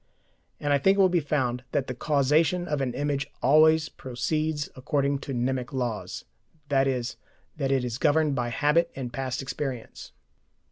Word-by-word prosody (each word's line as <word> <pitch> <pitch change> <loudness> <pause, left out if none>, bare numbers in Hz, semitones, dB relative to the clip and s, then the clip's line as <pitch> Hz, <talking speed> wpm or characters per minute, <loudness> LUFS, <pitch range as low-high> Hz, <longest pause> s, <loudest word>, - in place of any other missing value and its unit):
And 145 -1 +1
I 140 - +3
think 195 +8 +4
it - - 0
will 190 -1 +6
be 175 -1 +2
found 130 -5 -1
that 135 - +1
the 125 - -4
causation 150 +7 +2
of 150 -3 -1
an 125 -2 -2
image 140 -1 -1 0.2
always 155 +3 +5
proceeds 150 +4 -2
according 140 +1 0
to 140 - -7
mnemic 125 0 -1
laws, 120 -5 -3 0.5
i.e. 135 -2 +2 0.5
that 135 -2 -1
it 135 -2 +1
is 120 -1 -3
governed 150 0 +3
by 120 -2 -1
habit 150 +7 +2
and 125 -3 -5
past 130 +1 -3
experience. 130 -3 -5
140 Hz, 160 wpm, -27 LUFS, 130-150 Hz, 0.5 s, will